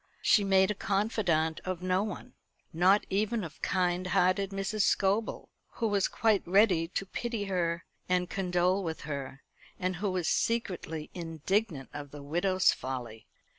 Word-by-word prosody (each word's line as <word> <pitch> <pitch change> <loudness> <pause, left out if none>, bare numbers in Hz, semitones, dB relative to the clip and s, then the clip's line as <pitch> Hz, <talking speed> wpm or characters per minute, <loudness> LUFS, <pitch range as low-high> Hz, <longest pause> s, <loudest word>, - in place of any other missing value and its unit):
She 210 - +5
made 190 0 +4
a - - 0
confidante 195 -6 0
of 185 -1 -4
no 185 +1 +2
one, 210 -2 -6 0.4
not 185 +5 +4
even 215 +2 0
of 160 -3 -9
kind 180 -1 0
hearted 185 +2 +2
Mrs. 195 +2 -2
Scobel, 200 +2 +1 0.2
who 230 - -1
was 200 -3 +2
quite 220 -4 +2
ready 185 -3 +4
to 195 +3 -3
pity 230 +2 -3
her 170 -3 -1 0.2
and 180 0 +2
condole 180 +1 +1
with 160 -2 -4
her, 140 -2 -6 0.4
and 185 -1 -1
who 200 +3 -1
was 180 -3 -1
secretly 180 -9 -1
indignant 165 - -2
at 145 -1 -7
the 145 0 -10
widow's 185 +5 +2
folly. 120 -4 -6
185 Hz, 150 wpm, -30 LUFS, 165-200 Hz, 0.4 s, She